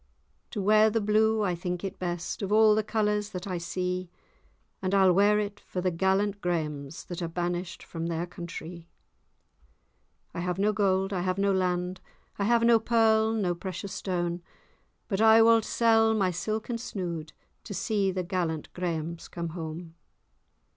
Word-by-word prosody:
To 205 - -4
wear 215 +2 +5
the 225 +1 0
blue 215 +1 +2
I 185 -3 +1
think 175 +1 -4
it 195 0 -5
best, 175 +1 -3
Of 200 0 -3
all 215 0 +6
the 215 - +2
colours 210 -1 0
that 180 -3 -6
I 185 -3 -3
see; 180 +1 -3 0.7
And 190 +1 0
I'll 190 -2 +5
wear 205 +3 +4
it 205 -1 -3
for 185 - -6
the 180 0 0
gallant 195 +3 +1
Grahams, 150 -4 -3
That 175 0 -7
are 170 - -1
banished 175 +1 -3
from 165 0 -5
their 170 0 -2
countrie. 170 -1 -8 1.5
I - - -5
have 180 +1 -2
no 210 +2 +2
gold, 195 -1 +1
I 180 - -1
have 185 +1 -1
no 200 0 +2
land, 180 0 -1 0.4
I 200 - +1
have 235 +1 +3
no 230 -1 +6
pearl 220 -1 +3
nor 195 -5 0
precious 190 +2 -6
stane; 175 -2 -2 0.7
But 200 -1 -1
I 225 0 +7
wald 230 -1 +5
sell 225 -1 +3
my 190 -4 +2
silken 220 +6 -3
snood, 175 -9 -5 0.3
To - - -6
see 200 +1 0
the 185 -1 -2
gallant 170 -3 -3
Grahams 170 -2 -3
come 170 -1 -5
hame. 165 0 -7
190 Hz, 170 wpm, -28 LUFS, 175-210 Hz, 1.5 s, I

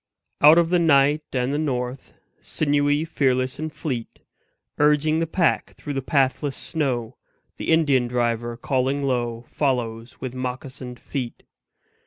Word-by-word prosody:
Out 150 +3 +8
of 170 0 +3
the 180 - +4
night 145 -2 +4
and 130 +1 -1
the 145 - 0
north, 130 -3 -3 0.2
Sinewy, 145 0 +1
fearless 130 -5 0
and 155 0 -3
fleet, 135 -5 -5 0.6
Urging 150 +1 +3
the 165 - 0
pack 170 +1 0
through 145 - -6
the 135 - -2
pathless 135 +1 +1
snow, 125 -6 -2 0.4
The - - -5
Indian 140 -6 +3
driver, 120 -1 -1
calling 135 +2 0
low, 120 -3 -1
Follows 120 -4 -2
with 130 -2 -5
moccasined 130 0 -6
feet. 125 -4 -5
135 Hz, 135 wpm, -23 LUFS, 125-150 Hz, 0.6 s, Out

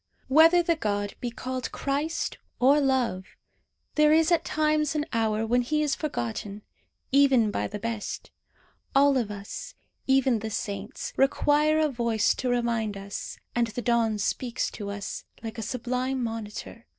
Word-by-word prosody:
Whether 325 +5 +6
the 335 0 +2
god 205 -7 -2
be 245 - -2
called 255 +2 -4
Christ 295 +4 -2 0.2
or 275 +4 +5
Love, 255 -9 +1 0.7
there 300 0 +4
is 320 +2 +4
at 340 - +3
times 305 0 +1
an 300 0 0
hour 220 -1 +1
when 245 +2 +2
he 305 +5 0
is 295 -2 +1
forgotten, 205 - -4 0.5
even 265 -6 +5
by - - -1
the 210 - -5
best. 225 0 -5 0.6
All 280 0 +5
of 240 -5 0
us, 200 -1 -7 0.3
even 265 -3 +3
the 220 +1 -4
saints, 205 -2 -5
require 295 +3 +3
a 310 -1 +3
voice 235 -5 +1
to 255 - -2
remind 235 -4 0
us; 200 +1 -6 0.2
and 240 -1 +1
the 235 +2 -5
dawn 230 -2 +2
speaks 235 +4 -1
to 205 -2 -6
us, 200 0 -5 0.2
like 225 0 -6
a - - -2
sublime 250 +2 -2
monitor. 225 0 -6
245 Hz, 155 wpm, -27 LUFS, 220-285 Hz, 0.7 s, Whether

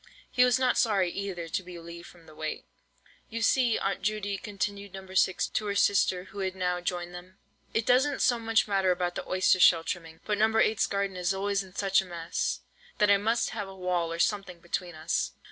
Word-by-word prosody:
He 250 - +4
was 250 0 +4
not 255 -1 +2
sorry 195 -6 +2
either 185 -4 -4
to 165 - -2
be 180 -1 -10
relieved 170 0 -10
from 170 -2 -17
the 155 - -15
weight. 155 0 -5 0.6
"You 230 0 -3
see, 240 -1 +3
Aunt 195 0 -2
Judy," 205 0 -1
continued 200 -1 -4
No. 190 0 -8
6 185 -1 +2
to 215 - -2
her 200 - -1
sister, 190 -2 +3
who 200 +2 -11
had 190 -1 -2
now 180 -1 -1
joined 175 0 -3
them, 180 +1 -11 0.3
"it 225 - 0
doesn't 265 +3 +3
so 240 -3 +3
much 225 -1 +2
matter 195 -2 +2
about 180 -1 0
the - - -6
oyster 185 0 +3
shell 165 -2 +6
trimming; 165 -1 -5
but 210 -1 -1
No. 220 - +5
8's 220 -1 +2
garden 200 -1 -2
is 180 +1 0
always 200 0 0
in 190 -1 -12
such 195 -1 +3
a - - -9
mess, 170 -2 -3 0.4
that 210 -1 +4
I 200 - +6
must 225 +4 0
have 215 -3 -4
a 195 - -10
wall 180 -2 -1
or 165 - -3
something 190 -1 -1
between 175 0 -4
us!" 155 +2 -1
190 Hz, 215 wpm, -28 LUFS, 175-210 Hz, 0.6 s, shell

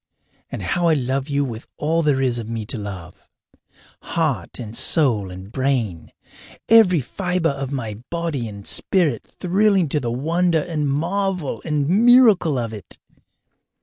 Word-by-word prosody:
And - - -5
how 175 -1 0
I 160 - +4
love 135 +1 -2
you 140 0 +1
with 115 -2 -7
all 165 +3 +1
there 145 -4 +1
is 120 -2 0
of 115 -1 -7
me 115 -2 -4
to 125 - -4
love 95 -5 -9 0.7
heart 140 - -2
and 115 -2 -7
soul 115 - +2
and 95 +2 -10
brain, 125 -10 -1 0.6
every 195 -8 +6
fibre 180 +4 -1
of 135 -1 -5 0.4
body 165 -8 -3
and 100 -2 -10
spirit 160 - +1 0.2
thrilling 195 -2 +2
to 150 - 0
the 120 - -3
wonder 165 +6 +1
and 155 -5 -2
marvel 180 +2 -1
and 150 -3 -1
miracle 215 - +5
of 115 -2 -3
it! 100 -6 -9
145 Hz, 150 wpm, -21 LUFS, 120-170 Hz, 0.7 s, every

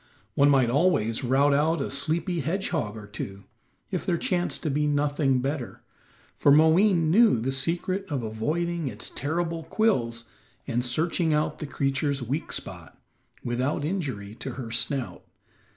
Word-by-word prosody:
One 140 +1 +4
might 130 -4 +4
always 135 -6 +2
rout 135 +3 +3
out 155 +3 +2
a 135 - -3
sleepy 170 +5 0
hedgehog 160 - -2
or 105 - -9
two, 100 -1 -7 0.5
if - - -2
there 170 - 0
chanced 175 +1 -1
to 155 - 0
be 150 +2 +1
nothing 145 -2 +1
better, 135 -1 -4 0.5
for 145 - +4
Moween 160 +2 +5
knew 220 - +5
the 125 +4 -1
secret 170 +8 -1
of 135 -5 -1
avoiding 155 +9 -2
its 110 -3 -7
terrible 165 +4 -2
quills 125 - 0 0.4
and 120 -2 -1
searching 160 +5 +1
out 150 - -1
the 150 - -5
creature's 135 0 -1
weak 135 +7 -3
spot, - - -6 0.4
without 130 +5 -1
injury 135 - -3
to - - -5
her 130 - -6
own 115 - -7
snout. 130 +2 -1
145 Hz, 150 wpm, -26 LUFS, 125-165 Hz, 0.5 s, Moween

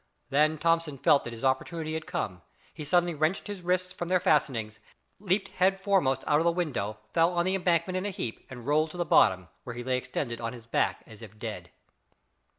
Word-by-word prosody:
Then 155 +3 +3
Thomson 165 -2 +1
felt 140 - +4
that 120 - -5
his 115 - -9
opportunity 155 +4 -1
had 160 +1 -4
come. 130 - -3 0.3
He 155 - -7
suddenly 175 +3 +2
wrenched 155 +4 0
his 205 -2 -6
wrists 180 +1 0
from 175 - -5
their 185 +1 +3
fastening, 130 -10 +1 0.5
leaped 195 0 0
head 190 +1 +2
foremost 180 - +2
out 150 0 +3
of - - +1
the 170 - +3
window, 130 - -2 0.2
fell 165 +1 +4
on 175 0 +1
the 185 - +1
embankment 180 -1 +1
in 185 +2 -2
a - - -1
heap, 120 - -5
and 125 -3 -9
rolled 155 +3 +2
to 175 - -10
the 175 - 0
bottom, 95 - +4
where 120 - -7
he 120 - -5
lay 130 0 0
extended 120 -2 -4
on 115 +1 -3
his 120 -2 -11
back 115 - 0
as 110 -1 -13
if 110 -1 -12
dead. 105 -6 -6
155 Hz, 215 wpm, -28 LUFS, 120-175 Hz, 0.5 s, felt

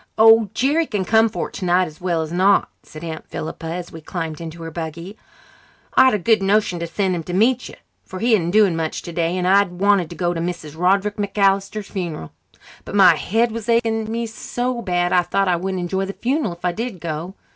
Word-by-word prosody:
"Oh, 225 -1 +6
Jerry 295 +5 +2
can 200 -4 -2
come 225 +3 +4
for 215 - -4
it - - -28
tonight 180 0 +1
as 155 -1 -12
well 170 -3 0
as 155 - -7
not," 190 +3 +3
said 155 +1 -12
Aunt 160 -2 -6
Philippa, 160 +1 -6
as 175 +1 -5
we 160 - -10
climbed 165 -1 -5
into 165 0 -8
her 165 - -6
buggy. 170 +4 -6 0.8
"I'd 260 -4 +5
a - - +1
good 215 +3 +2
notion 195 -2 +1
to 170 - -3
send 190 +2 -1
him 170 - -3
to 175 +2 -7
meet 240 +5 +2
you, - - -11 0.3
for 185 - -9
he 230 +4 +2
isn't 175 -6 +2
doing 200 -2 +4
much 160 -1 -3
today, 170 +1 -2
and 180 0 0
I 200 +2 +6
wanted 185 -1 +1
to 175 - -8
go 175 0 0
to 165 - -3
Mrs. 170 -3 -5
Roderick 195 +4 +1
MacAllister's 200 0 0
funeral. 170 - -5 0.5
But - - -7
my 190 -4 +7
head 225 +8 0
was 230 0 -6
aching 225 -1 +1
me 230 +1 -2
so 245 +2 -3
bad 175 -4 0
I 180 - +5
thought 195 +2 0
I 180 - +3
wouldn't 185 +1 -3
enjoy 190 +2 -1
the 195 - -5
funeral 255 - -1
if 175 +1 -10
I 180 - +2
did 225 0 -5
go. 165 +3 -5
185 Hz, 220 wpm, -21 LUFS, 170-215 Hz, 0.8 s, my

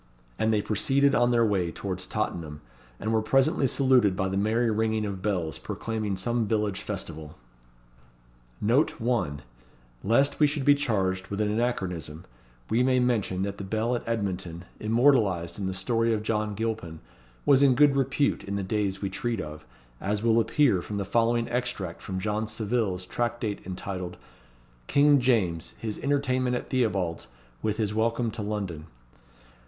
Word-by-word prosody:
And 110 - +2
they 105 -2 +1
proceeded 135 +6 +2
on 120 -1 +4
their 120 -1 +3
way 95 -5 0
towards 95 -1 -5
Tottenham, 80 -8 -3 0.4
and 110 +1 -1
were 110 - +3
presently 135 +5 +2
saluted 125 -7 +3
by 95 0 -1
the 95 - -2
merry 110 +4 +1
ringing 110 0 0
of 100 -2 -4
bells, 85 -9 -1
proclaiming 110 -4 -3
some 120 +3 0
village 105 -2 0
festival. 75 0 -6 1.2
NOTE: 120 +8 +2 1.1
Lest 135 +7 +2
we 150 - +6
should 145 -2 -2
be 145 - +7
charged 95 -10 0
with 100 - -4
an 105 -1 +1
anachronism, 90 -9 -2 0.5
we 115 - +3
may 130 0 +3
mention 110 -7 0
that 100 0 -4
the - - -4
Bell 110 +5 0
at 120 - -2
Edmonton, 95 -6 -3
immortalized 110 -7 +2
in 95 - -2
the - - -1
story 115 +2 +1
of 105 - -4
John 105 -1 -1
Gilpin, 110 -7 -3 0.5
was 140 -1 +5
in 135 -3 +5
good 145 +1 +5
repute 135 +1 +1
in 100 - -4
the 100 - -2
days 100 0 -1
we 100 - 0
treat 120 -3 -2
of, 75 -1 -7 0.3
as 105 +2 -2
will 115 0 +4
appear 115 -4 +3
from 105 +3 -5
the 100 - -2
following 115 +3 +1
extract 120 -8 -3
from 95 - -5
John 105 +2 -1
Savile's 110 -4 -1
Tractate 120 0 -2
entitled, 90 -1 -5 0.7
King 145 0 +5
James, 105 -10 +1
his 110 -2 -4
Entertainment 130 -3 +1
at - - -5
Theobald's, 100 - 0 0.3
with 110 -1 -1
his 105 -2 -1
Welcome 115 +1 0
to 115 - -6
London. 100 -7 -4
110 Hz, 160 wpm, -27 LUFS, 95-120 Hz, 1.2 s, be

